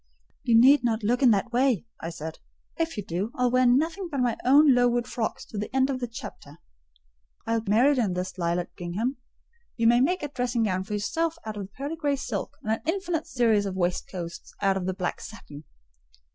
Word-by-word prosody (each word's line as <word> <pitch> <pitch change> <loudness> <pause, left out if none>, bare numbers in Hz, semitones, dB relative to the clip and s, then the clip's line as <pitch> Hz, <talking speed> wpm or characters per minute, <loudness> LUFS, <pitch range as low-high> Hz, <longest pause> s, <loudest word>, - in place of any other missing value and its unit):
"You 230 -1 +4
need 265 +2 +6
not 225 -2 0
look 245 +5 +1
in 260 - +6
that 215 +2 +2
way," 245 -4 +2
I 165 - -5
said; 160 -1 -7 0.4
"if 330 -4 -2
you 205 - -4
do, 190 +6 -3
I'll 250 -2 +1
wear 255 0 +4
nothing 325 +9 +1
but 280 -4 -3
my 245 -2 +1
old 280 +5 +6
Lowood 245 -2 +4
frocks 230 -2 -3
to 210 - -6
the 210 - -3
end 265 +1 +3
of 260 - -3
the 245 - -3
chapter. 230 - -10 0.9
I'll 230 0 0
be 215 - -7
married 255 +6 +4
in 205 -6 +1
this 180 +1 -4
lilac 175 0 -1
gingham: 210 +10 -3 0.6
you 230 - +1
may 240 +1 +5
make 355 +5 +1
a - - -1
dressing 245 -3 -1
gown 185 -3 -1
for 210 - -6
yourself 325 +11 -1
out 215 -1 -5
of 200 -2 -5
the 195 - -39
pearl 285 +4 -3
grey 290 -3 0
silk, 240 -7 -4
and 220 - -1
an 225 - 0
infinite 340 -2 -1
series 225 -5 +2
of 190 - -4
waistcoats 175 -1 -3
out 195 -1 +2
of 185 -1 -3
the 185 - -1
black 185 -2 -3
satin." 155 -10 -10
235 Hz, 215 wpm, -26 LUFS, 195-265 Hz, 0.9 s, need